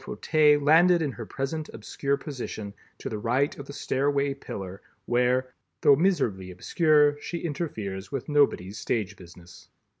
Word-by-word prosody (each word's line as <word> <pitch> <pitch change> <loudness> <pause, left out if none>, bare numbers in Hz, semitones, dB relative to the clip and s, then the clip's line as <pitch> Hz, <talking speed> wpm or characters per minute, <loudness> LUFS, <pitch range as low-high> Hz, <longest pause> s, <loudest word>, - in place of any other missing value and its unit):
Fauteuil 150 -2 +3
landed 165 +5 +5
in 145 - -1
her 115 -3 -8
present 150 +3 -4
obscure 140 +5 -2
position, 120 -8 -6 0.2
to - - -7
the 110 - -4
right 125 +6 +1
of 140 - -8
the 140 - -8
stairway 140 0 0
pillar, 95 -8 -8 0.2
where, 125 +1 +1 0.3
though 140 - +7
miserably 120 - 0
obscure, 145 - +2
she 170 - -4
interferes 110 - -4
with 135 - -4
nobody's 140 - +1
stage 105 -4 -2
business. 90 -1 -15
135 Hz, 145 wpm, -26 LUFS, 105-150 Hz, 0.3 s, though